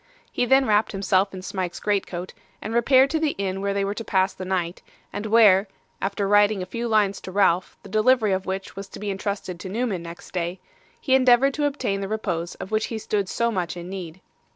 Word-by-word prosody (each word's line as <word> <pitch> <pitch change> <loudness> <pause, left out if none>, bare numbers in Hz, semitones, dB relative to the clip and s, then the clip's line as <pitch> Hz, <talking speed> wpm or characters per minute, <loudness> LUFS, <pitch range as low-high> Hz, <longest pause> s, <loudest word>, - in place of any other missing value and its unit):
He 245 - 0
then 265 +2 +5
wrapped 215 -1 +2
himself 195 0 +1
in 185 -1 -8
Smike's 185 -2 -4
greatcoat, 190 -3 -2 0.3
and 220 - -5
repaired 260 +3 +4
to 320 - +1
the 310 -2 0
inn 195 -1 -2
where 200 0 0
they 200 0 0
were 200 - -2
to 230 - -6
pass 190 -3 +1
the 185 - -7
night, 180 -2 -2 0.3
and 215 - -4
where 210 -3 +6 0.3
(after 200 +1 -1
writing 205 -1 +4
a - - -5
few 235 +5 -4
lines 210 -3 +2
to 185 - -8
Ralph, 185 -2 +2
the 200 - -11
delivery 215 +1 +3
of 190 0 -1
which 190 +1 -4
was 195 0 -7
to - - -11
be 205 -1 -3
intrusted 195 -2 -4
to 185 - -7
Newman 215 -3 -2
next 170 0 -10
day), 175 0 -3 0.4
he 265 - 0
endeavoured 260 +1 +5
to 295 0 0
obtain 245 -9 -1
the 195 - -3
repose 175 -5 -3
of 190 - -8
which 215 0 +1
he 225 - -4
stood 210 -3 -2
so 235 0 0
much 180 -4 -3
in 175 +1 -7
need. 185 -2 -7
200 Hz, 225 wpm, -24 LUFS, 185-220 Hz, 0.4 s, where